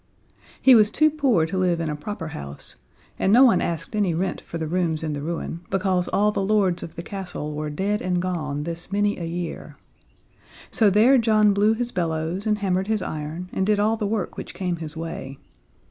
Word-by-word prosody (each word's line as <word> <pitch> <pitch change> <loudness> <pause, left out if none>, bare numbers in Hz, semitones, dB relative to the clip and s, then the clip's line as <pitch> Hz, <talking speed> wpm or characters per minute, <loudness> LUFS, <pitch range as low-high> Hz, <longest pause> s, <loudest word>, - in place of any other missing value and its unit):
He 265 - +7
was 215 -3 +6
too 310 +7 +3
poor 270 - +2
to 185 +3 -3
live 180 -2 +1
in 165 - -2
a 150 - -2
proper 165 +1 -6
house, 70 - -9 0.4
and 190 - +2
no 245 +5 +7
one 230 -9 +5
asked 165 +4 -3
any 195 -6 +1
rent 185 +3 -2
for 170 - -7
the 160 - -3
rooms 165 -1 -1
in 155 -1 -2
the 145 - -4
ruin, 165 +1 -4
because 185 -2 0
all 210 +1 +2
the 205 - -2
lords 195 -3 +2
of 165 - -8
the 170 - -6
castle 180 -6 -5
were 150 0 -3
dead 195 +8 -1
and 180 -1 0
gone 155 -5 -2
this 170 +3 -5
many 205 0 +1
a 170 - -4
year. 170 0 -5 0.9
So 220 -4 +4
there 230 +7 +5
John 215 -2 +4
blew 210 +2 +3
his 245 +1 -3
bellows 170 +3 -2
and 210 -1 +2
hammered 190 -1 0
his 215 -3 0
iron 155 +4 -5
and 190 - 0
did 210 +1 +2
all 215 +2 +2
the 215 -2 -2
work 205 -3 -2
which - - -7
came 180 -2 -2
his 160 -1 -7
way. 150 -4 -6
185 Hz, 210 wpm, -24 LUFS, 165-210 Hz, 0.9 s, He